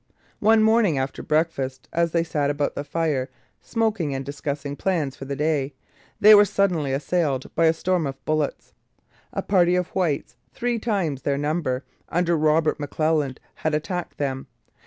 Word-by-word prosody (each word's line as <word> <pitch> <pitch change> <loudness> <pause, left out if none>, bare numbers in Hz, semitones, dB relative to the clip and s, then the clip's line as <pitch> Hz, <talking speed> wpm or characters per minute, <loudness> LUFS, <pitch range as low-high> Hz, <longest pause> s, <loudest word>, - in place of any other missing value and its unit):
One 220 +1 +5
morning 220 -8 +4
after 130 +1 -3
breakfast, 140 -5 -1
as 170 0 +1
they 170 0 +2
sat 150 -3 -1
about 145 0 -1
the 140 - -4
fire 145 -3 -1 0.3
smoking 215 - -1
and 135 0 -4
discussing 140 0 -4
plans 155 -6 -1
for 135 - -8
the 140 +1 -3
day, 145 -2 0 0.4
they 215 +1 +9
were 205 0 +9
suddenly 180 -8 +1
assailed 140 -1 -1
by 165 - +3
a 160 - +5
storm 175 -1 0
of 135 0 -8
bullets. 155 -2 -2 0.6
A - - -3
party 180 -3 +3
of 180 -1 0
whites, 165 -9 -1 0.2
three 240 -1 -1
times 190 - -1
their 140 +1 0
number, 145 -3 -1 0.2
under 175 0 +1
Robert 155 0 +2
McClelland, 150 -2 0 0.2
had 155 -1 0
attacked 175 +3 -4
them. 135 -2 -3
155 Hz, 160 wpm, -24 LUFS, 140-180 Hz, 0.6 s, they